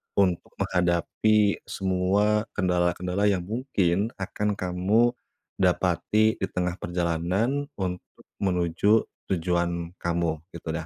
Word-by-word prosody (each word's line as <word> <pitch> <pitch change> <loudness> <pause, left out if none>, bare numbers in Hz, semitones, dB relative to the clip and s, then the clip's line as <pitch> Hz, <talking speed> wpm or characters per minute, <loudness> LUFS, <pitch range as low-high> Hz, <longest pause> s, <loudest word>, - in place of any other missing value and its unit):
untuk 90 -3 +1
menghadapi 95 +4 +2
semua 100 +3 +1
kendala-kendala 90 +1 0
yang 100 -3 +2
mungkin 105 -2 0
akan 105 +2 -1
kamu 100 +6 +2 0.5
dapati 95 +4 +2
di 95 - -1
tengah 90 -1 -1
perjalanan 90 - 0
untuk 90 -2 -5 0.2
menuju 95 +3 +2 0.3
tujuan 85 -1 -1
kamu, 85 -1 0 0.2
gitu 85 - -10
dah. 80 0 -4
90 Hz, 100 wpm, -26 LUFS, 85-105 Hz, 0.5 s, menghadapi